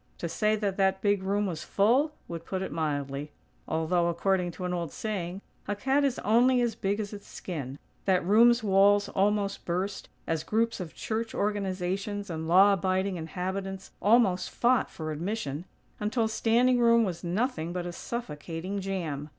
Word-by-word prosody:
To 170 - -3
say 215 +5 +1
that 205 -3 -2
that 190 -1 +2
big 205 -2 +2
room 200 +2 0
was 165 -5 -3
full, 255 +10 +2
would 165 -1 -6
put 190 +2 -3
it - - -5
mildly. 145 -2 -2 0.4
Although, 170 +2 +1
according 180 +1 +1
to 180 - -6
an 180 - -1
old 170 -3 -3
saying, 195 -3 -4 0.3
"a 205 - -1
cat 270 +7 +1
is 275 -3 +1
only 245 +4 +4
as 240 -2 +1
big 200 -1 -1
as 210 -1 -4
its 200 -1 -9
skin," 140 -7 -6 0.3
that 185 -3 +2
room's 230 +4 +5
walls 200 0 +4
almost 200 0 0
burst, 185 +3 -3 0.2
as 165 -1 -1
groups 230 +1 0
of 175 -4 -7
church 225 0 -3
organizations 200 0 -2
and 160 0 -4
law 190 +4 +6
abiding 190 0 0
inhabitants 190 +4 -4
almost 205 -4 +3
fought 250 +1 +2
for 155 -1 -5
admission; 165 -2 -3 0.3
until 220 +2 0
standing 240 +3 +3
room 235 -1 +5
was 180 -5 -3
nothing 175 -2 -1
but 180 0 -3
a 175 - -4
suffocating 175 -2 -5
jam. 165 -7 -3
195 Hz, 165 wpm, -28 LUFS, 175-215 Hz, 0.4 s, law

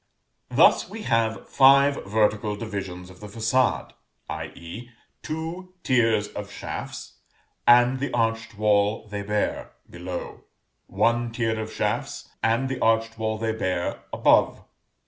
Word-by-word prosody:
Thus - - +4
we 220 - -7
have 115 - 0
five 140 +1 +5
vertical 105 0 +1
divisions 95 -4 -6
of 90 - -16
the 105 - -9
façade; 115 +4 0 0.4
i.e. 105 +9 -7 0.3
two 170 +4 -6
tiers 115 -4 +2
of - - -7
shafts, - - -7 0.5
and 120 +2 +6
the 140 - -2
arched 115 -2 -1
wall 105 +1 +2
they 105 -1 -5
bear, 105 +1 -2
below; 90 +1 -7 0.4
one 120 0 +1
tier 115 -1 -1
of 110 0 -5
shafts, - - -3
and 115 +4 +1
the 130 -1 -4
arched 115 0 +1
wall 110 0 -1
they 110 0 -1
bear, 90 -5 -2
above. - - +3
115 Hz, 125 wpm, -25 LUFS, 105-120 Hz, 0.5 s, and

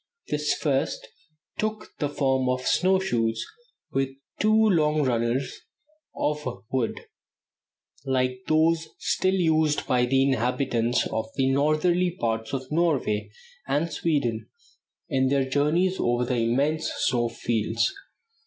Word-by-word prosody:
This 150 0 0
first 140 -4 -1 0.5
took 215 0 -3
the 145 - 0
form 135 -3 +1
of 130 0 -1
snow 190 +1 +3
shoes 115 -12 -1 0.5
with 135 0 0 0.3
two 215 - +3
long 165 -9 +3
runners 120 +1 -1 0.6
of 150 0 -1 0.3
wood, 130 -4 -1 1.0
like 130 -2 0
those 160 +1 +2
still 190 +1 +1
used 160 -4 +2
by 125 -1 +2
the 135 +2 +3
inhabitants 125 -2 +1
of 110 0 -2
the 135 -1 +2
northerly 170 +6 +2
parts 115 -1 -1
of 130 0 -4
Norway 150 -10 +1 0.4
and 160 +2 0
Sweden 135 -9 -1 0.6
in 130 0 +1
their 135 -1 +1
journeys 155 +7 +1
over 120 +1 +1
the 125 0 -1
immense 140 +8 +1
snow 120 -1 +1
fields. 115 - -1
135 Hz, 120 wpm, -25 LUFS, 125-160 Hz, 1.0 s, snow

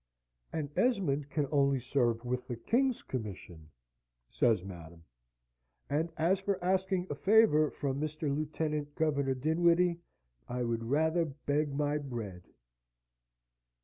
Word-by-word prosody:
"An 150 -3 -3
Esmond 170 - +1
can 150 -1 0
only 140 -2 +3
serve 120 -2 0
with 125 +1 -2
the 120 - -3
king's 245 - +1
commission," 90 -9 -7 0.6
says 115 -7 +2
Madam, 85 -3 -10 0.9
"and 160 +3 0
as 175 +4 +2
for 195 0 -1
asking 190 0 +1
a - - +1
favour 155 -3 +4
from 140 0 -3
Mr. 155 -2 -2
Lieutenant 150 -1 -2
Governor 140 -4 +1
Dinwiddie, 170 +4 +2 0.5
I 125 0 -2
would 115 -1 -2
rather 160 +4 +2
beg 145 0 -1
my 145 +1 0
bread." 115 -10 -6
145 Hz, 120 wpm, -32 LUFS, 125-165 Hz, 0.9 s, favour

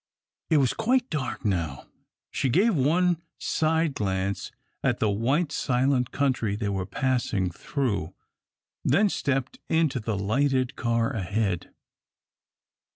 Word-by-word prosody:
It 160 - +4
was 135 -4 +3
quite 245 +3 +1
dark 140 -6 -3
now. 85 -9 -1 0.5
She 135 - 0
gave 205 - +4
one 170 +5 +2 0.2
side 160 -1 +1
glance 95 -3 -2 0.3
at - - +2
the 110 - +1
white, 135 - +1
silent 125 -2 +1
country 130 -7 0
they 105 -1 -2
were 95 -2 -2
passing 120 -6 0
through, 100 - -2 0.7
then 205 0 +4
stepped 135 -6 -1
into 160 -5 +2
the 110 -2 -2
lighted 130 +5 +1
car 115 -1 0
ahead. 100 -2 -1
130 Hz, 120 wpm, -26 LUFS, 100-150 Hz, 0.7 s, It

